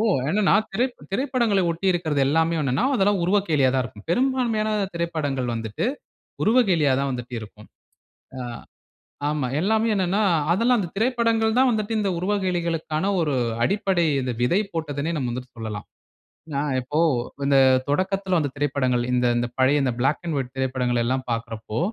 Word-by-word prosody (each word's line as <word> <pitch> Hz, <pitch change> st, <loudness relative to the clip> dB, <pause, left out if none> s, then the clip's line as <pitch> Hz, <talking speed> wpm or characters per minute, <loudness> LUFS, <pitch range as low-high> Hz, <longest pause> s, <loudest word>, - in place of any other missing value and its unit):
ஓ! -, -, +2 dB, 0.2 s
என்னன்னா, 200 Hz, +5 st, +2 dB, 0.2 s
திரை 235 Hz, +6 st, +1 dB, 0.3 s
திரைப்படங்கள 235 Hz, -5 st, +1 dB
ஒட்டி 170 Hz, +4 st, -3 dB
இருக்கறது 155 Hz, -5 st, -1 dB
எல்லாமே 160 Hz, +3 st, +2 dB
என்னன்னா, 135 Hz, -, 0 dB
அதெல்லாம் 200 Hz, -3 st, +2 dB
உருவக்கேலியா 170 Hz, -9 st, +2 dB
தான் 130 Hz, -1 st, +1 dB
இருக்கும். 105 Hz, -4 st, -11 dB
பெரும்பான்மையான 240 Hz, -2 st, +1 dB, 0.2 s
திரைப்படங்கள் 145 Hz, -7 st, -2 dB
வந்துட்டு 115 Hz, -, -3 dB, 0.6 s
உருவக்கேலியா 190 Hz, -, +3 dB
தான் 140 Hz, 0 st, -1 dB
வந்துட்டு 125 Hz, 0 st, -6 dB
இருக்கும். 105 Hz, 0 st, -12 dB, 0.7 s
அ -, -, -5 dB, 0.9 s
ஆமா. 150 Hz, -3 st, -1 dB
எல்லாமே 220 Hz, +4 st, +2 dB
என்னன்னா, 190 Hz, +2 st, +1 dB, 0.3 s
அதெல்லாம் 235 Hz, +6 st, +3 dB
அந்த 180 Hz, -, -3 dB
திரைப்படங்கள் 230 Hz, -1 st, +1 dB
தான் 260 Hz, 0 st, +5 dB
வந்துட்டு 215 Hz, 0 st, -1 dB
இந்த 200 Hz, -2 st, 0 dB
உருவகேலிகளுக்கான 175 Hz, -4 st, -1 dB, 0.2 s
ஒரு 150 Hz, -3 st, 0 dB, 0.3 s
அடிப்படை 190 Hz, 0 st, +1 dB, 0.4 s
விதை 175 Hz, +12 st, +3 dB
போட்டதுன்னே 155 Hz, 0 st, -3 dB
நாம 130 Hz, -4 st, -2 dB
வந்து 125 Hz, +1 st, -4 dB
சொல்லலாம். 110 Hz, -2 st, -5 dB, 0.6 s
எப்படின்னா 145 Hz, -2 st, -2 dB, 0.2 s
இப்போ 145 Hz, +5 st, -2 dB, 0.5 s
இந்த 140 Hz, -1 st, +4 dB, 0.3 s
தொடக்கத்தில 190 Hz, +3 st, 0 dB
வந்த 145 Hz, -3 st, -1 dB
திரைப்படங்கள், 130 Hz, -4 st, 0 dB
இந்த 125 Hz, 0 st, +2 dB
இந்த 120 Hz, 0 st, 0 dB
பழைய 140 Hz, +2 st, +4 dB, 0.2 s
பிளாக் 135 Hz, +6 st, +1 dB
அண்ட் 160 Hz, -, -1 dB
வைட் 125 Hz, -2 st, -4 dB
திரைப்படங்கள் 125 Hz, -2 st, 0 dB
எல்லாம் 130 Hz, +1 st, -1 dB
பார்க்கிறப்போ 115 Hz, 0 st, -4 dB
165 Hz, 140 wpm, -23 LUFS, 130-205 Hz, 0.9 s, தான்